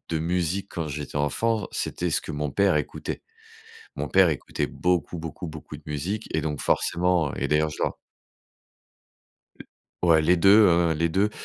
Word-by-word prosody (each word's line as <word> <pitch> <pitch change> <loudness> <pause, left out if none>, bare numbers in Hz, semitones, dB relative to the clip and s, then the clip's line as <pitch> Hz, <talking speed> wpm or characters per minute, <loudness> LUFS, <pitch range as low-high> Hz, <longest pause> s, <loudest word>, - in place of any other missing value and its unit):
de 80 - 0
musique 90 +3 -1
quand 80 -3 -4
j'étais 75 0 -6
enfant, 110 +10 0
c'était 90 - -2
ce - - +1
que 80 - -7
mon 75 -1 -2
père 100 -3 +3
écoutait. 75 - -3 0.7
Mon - - -3
père 95 -2 +5
écoutait 75 - -2
beaucoup, 90 -1 -1
beaucoup, 80 +2 -6
beaucoup 75 -1 -9
de 75 - -17
musique 90 +9 -3
et 80 - +1
donc 75 -1 -3
forcément 85 -4 +1
et - - -2
d'ailleurs, 75 +1 +2
je - - -8
dois - - -1 2.1
Ouais 80 -2 +5
les 90 +4 +3
2, 100 +4 +7
hein, 85 -1 +3
les 85 +2 +1
2. 100 +5 +1
85 Hz, 170 wpm, -25 LUFS, 75-90 Hz, 2.1 s, 2